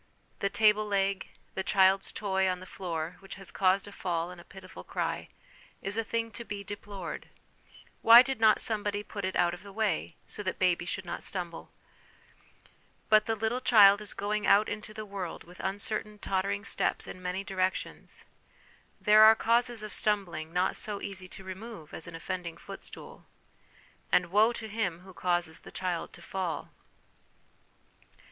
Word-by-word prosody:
The 200 - +1
table 215 +1 +4
leg, 195 -1 0 0.3
the 190 - -2
child's 190 0 +3
toy 190 -2 0
on 180 - 0
the 185 - -10
floor, 170 -3 -4
which 195 0 -9
has 195 -1 -9
caused 190 +1 +2
a - - -9
fall 175 -3 -2
and 180 -1 -10
a - - -15
pitiful 185 0 -12
cry, - - -3 0.6
is 195 +1 -2
a 225 - 0
thing 230 +1 -2
to 235 - -6
be 205 -3 -6
deplored; 200 -3 -7 0.7
why 235 +2 +10
did 265 -3 -3
not 220 -1 +6
somebody 205 -2 -1
put 200 -2 -5
it 190 - -3
out 175 0 +3
of 175 - -8
the 200 - -11
way, 195 -5 -1
so - - -6
that 190 -2 -1
the 185 - +1
baby 175 -1 +2
should 190 +2 -4
not 175 - -5
stumble? 175 -3 -4 1.4
But 215 0 +6
the 225 - +1
little 220 +4 -1
child 205 -4 +7
is 210 - -5
going 210 +1 -1
out 210 +2 +6
into 215 0 -5
the 215 0 -7
world 195 -4 -6
with 175 +1 -16
uncertain 210 +2 -3
tottering 200 +1 -1
steps - - 0
in 185 - -9
many 180 +2 -3
directions. 190 -1 -3 0.7
There 215 +1 +6
are 220 +1 +9
causes 235 0 +2
of 215 - -6
stumbling 180 -8 0
not 180 +2 +1
so 205 -2 -2
easy 190 -2 -6
to 190 - -10
remove 190 -3 -9
as 160 - -6
an 165 - -8
offending 175 0 -5
footstool; - - -10 0.8
and 175 -1 +3
woe 215 +4 +5
to 230 -2 -5
him 200 -6 -2
who 190 0 -13
causes 175 -3 -1
the - - -12
child 180 -3 -3
to - - -13
fall 185 -4 -3
195 Hz, 175 wpm, -30 LUFS, 185-215 Hz, 1.4 s, why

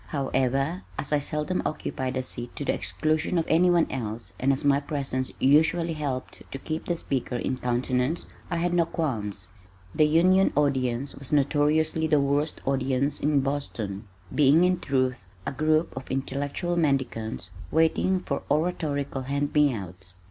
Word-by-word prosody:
However, 135 +4 0 0.2
as 145 - -3
I 150 - +4
seldom 150 +5 -2
occupied 130 -3 -3
a 130 - -1
seat 120 -1 -7
to 145 - -4
the - - +2
exclusion 155 +3 -1
of 165 - +1
anyone 175 +1 +4
else 115 -3 -5
and 135 +2 +3
as 135 +2 -1
my 140 0 +4
presence 135 -3 -3
usually 160 +4 +3
helped 140 -4 -4
to - - -4
keep 155 +3 -4
the 175 - 0
speaker 135 -6 -2
in 130 +1 -2
countenance, 125 +5 0 0.2
I 175 - -1
had 175 +1 0
no 170 -1 +3
qualms. 105 - -3 0.5
The 155 - +4
Union 185 +5 +4
audience 135 -2 +1
was 135 -2 -7
notoriously 150 +2 +2
the 150 -2 +4
worst 140 +2 0
audience 135 +1 0
in 145 -1 +2
Boston, 115 -7 -3 0.3
being 150 +3 +5
in 180 0 +2
truth 130 -5 0 0.2
a - - -2
group 155 +3 +1
of 130 0 -7
intellectual 140 +6 -2
mendicants 125 - -1 0.2
waiting 165 +3 +2
for 140 -6 -3
oratorical 145 -3 -1
hand 140 +2 -2
me 150 -2 +5
outs. 95 -4 -8
140 Hz, 155 wpm, -26 LUFS, 130-155 Hz, 0.5 s, being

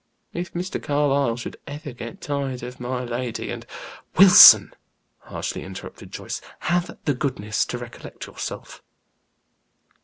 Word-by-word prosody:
If 175 +1 -5
Mr. 180 +2 -4
Carlyle 140 -4 +1
should 120 - -7
ever 145 0 -7
get 115 -2 -9
tired 140 -4 -4
of 125 +1 -8
my 125 0 -3
lady, 120 0 -4
and - - -8 0.2
" - - -20
"Wilson," 190 0 +9 0.5
harshly - - -6
interrupted 95 0 -10
Joyce, - - -6 0.2
"have 175 +1 -1
the 145 - +2
goodness 125 -5 -2
to 120 - -4
recollect 120 -1 -10
yourself." - - -8
130 Hz, 130 wpm, -23 LUFS, 120-145 Hz, 0.5 s, Wilson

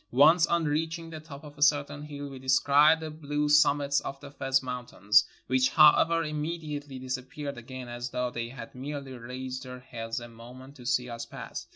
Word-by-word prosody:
Once 155 +6 +6
on 170 -1 +1
reaching 165 +2 -2
the 160 - -7
top 155 -2 -11
of 145 -1 -11
a - - -11
certain 145 -1 +2
hill 145 -1 -7
we 135 -2 -9
descried 140 +4 +5
the 160 -1 -6
blue 150 -1 -2
summits 145 -1 +4
of 135 0 -6
the 140 - -11
Fez 135 -1 0
Mountains, 125 -4 +2 0.2
which, 130 0 +2
however, 165 +2 +5
imme 155 +2 -3
diately 145 -4 -6
disappeared 130 +3 -5
again 125 +1 -8
as 120 +1 -5
though 125 0 -2
they 115 -1 -4
had 120 -2 -9
inerely 140 0 -6
raised 130 +1 -6
their 125 -1 -8
heads 115 -2 -5
a 120 - -9
moment 125 +4 -13
to 125 -3 -10
see 125 0 +1
us 115 -1 -6
pass. - - -8
140 Hz, 195 wpm, -28 LUFS, 125-150 Hz, 0.2 s, Once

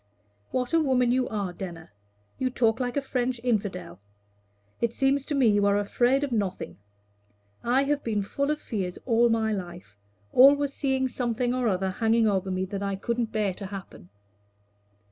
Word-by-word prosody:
"What 250 +3 -2
a 330 - +5
woman 255 -5 +2
you 255 0 +1
are, 200 -4 -3
Denner! 170 - -8 0.5
You 260 - +1
talk 230 -2 +1
like 245 +1 -2
a 280 - 0
French 250 -2 -1
infidel. 200 - -2 0.8
It 235 -1 +1
seems 275 0 +2
to 295 - -2
me 270 -3 +3
you 205 -2 +4
are 200 0 +3
afraid 245 +7 +2
of 280 - -2
nothing. 200 - -3 0.8
I 255 +3 +3
have 290 +1 -1
been 210 -3 -1
full 280 +8 -2
of 300 0 0
fears 190 -9 -4
all 235 -1 +4
my 220 -1 +1
life 175 - -7 0.3
always 280 +2 +6
seeing 265 -2 0
something 245 -1 -1
or 250 -1 0
other 190 -2 0
hanging 225 +3 +2
over 195 -2 0
me 185 0 -1
that 195 +1 -5
I 200 -1 -1
couldn't 235 +3 -2
bear 210 -3 0
to 195 +1 -7
happen." 190 - -9
230 Hz, 175 wpm, -26 LUFS, 200-255 Hz, 0.8 s, always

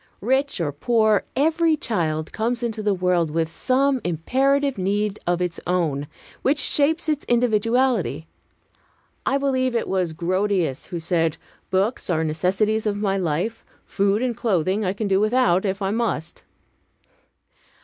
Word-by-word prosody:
Rich 265 +5 0
or 155 -4 -1
poor, 215 +7 +2
every 320 +3 +2
child 160 - -2
comes 235 +2 -1
into 225 -2 -2
the 210 -1 +1
world 180 -3 +1
with 160 +1 -1
some 265 +6 +1
imperative 270 - +1
need 205 +2 -1
of 175 0 +1
its 175 -2 -3
own, 155 -6 0 0.3
which 280 +3 +2
shapes 300 +4 +2
its 300 -2 0
individuality. 230 - +1 1.0
I 275 - +3
believe 260 -3 0
it 230 - 0
was 180 -4 -1
Grotius 180 -3 -1
who 175 - -5
said, 165 -1 0 0.3
"Books 195 +5 0
are 160 -2 +1
necessities 195 +7 0
of 205 -1 0
my 200 -2 0
life. 185 +5 -2 0.2
Food 200 +3 +1
and 245 -2 -1
clothing 195 -1 0
I 185 -1 0
can 205 +1 -3
do 195 -1 +2
without, 215 -3 +2
if 195 +1 -2
I 195 - 0
must." 215 -8 -2
205 Hz, 145 wpm, -23 LUFS, 175-245 Hz, 1.0 s, I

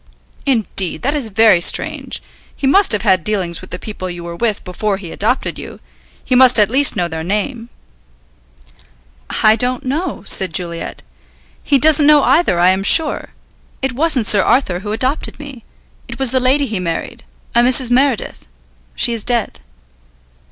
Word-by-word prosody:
"Indeed; 215 -8 -1
that 280 +4 0
is 285 -6 -1
very 215 -4 +3
strange. - - +1 0.3
He - - -5
must 390 +7 +4
have 210 -2 +2
had 190 -5 +2
dealings 180 -4 -2
with 185 - -13
the - - -6
people 195 -4 -7
you 175 -1 -8
were 170 0 -7
with 215 +1 -2
before 195 +2 -3
he 180 -4 -9
adopted 240 +6 -2
you. - - -10 0.5
He - - -2
must 250 -1 +6
at 210 0 +3
least 275 +1 +5
know 175 -4 -1
their 160 -1 -6
name?" 225 - -3 1.7
"I 215 0 +5
don't 250 +4 -2
know," 300 - -4
said 185 -5 0
Juliet. 170 -2 -6 0.6
"He 285 - +2
doesn't 300 +1 +4
know 300 -1 +5
either, 325 - +2
I 180 +1 +4
am 190 +1 -1
sure. 305 +9 +1 0.5
It 265 -1 -1
wasn't 280 -3 0
Sir 200 -1 +5
Arthur 185 -6 0
who 205 +2 -6
adopted 255 +7 -3
me. 275 -5 -11 0.4
It - - -9
was 265 -3 +1
the 260 - +1
lady 265 +3 +1
he 215 -6 -4
married. 170 -2 -5 0.3
A - - +3
Mrs. 250 0 +2
Meredith. 260 -1 0 0.5
She 240 - +2
is 225 -3 -5
dead." 240 -3 -2
230 Hz, 170 wpm, -16 LUFS, 190-265 Hz, 1.7 s, must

